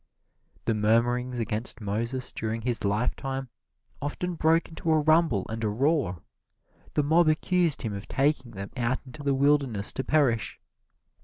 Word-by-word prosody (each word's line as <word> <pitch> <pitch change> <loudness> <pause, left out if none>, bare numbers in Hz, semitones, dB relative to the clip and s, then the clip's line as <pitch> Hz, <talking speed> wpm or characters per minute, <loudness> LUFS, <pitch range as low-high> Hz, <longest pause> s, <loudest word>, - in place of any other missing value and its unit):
The 115 - +2
murmurings 120 +4 +1
against 115 0 -3
Moses 115 +5 -3
during 110 0 -3
his 120 -1 0
lifetime 130 +6 -1 0.5
often 175 +5 -3
broke 165 0 +2
into 165 0 -5
a 155 - +4
rumble 155 - +3
and 115 +1 -5
a 110 - +1
roar. 125 - 0 0.7
The 150 - +3
mob 160 +3 +4
accused 165 0 +2
him 110 -3 -2
of 100 0 -7
taking 135 -3 0
them 100 0 -7
out 125 0 0
into 135 +3 -11
the 140 -1 +1
wilderness 135 -7 +2
to 130 - -3
perish. 130 -9 +1
130 Hz, 150 wpm, -27 LUFS, 110-150 Hz, 0.7 s, a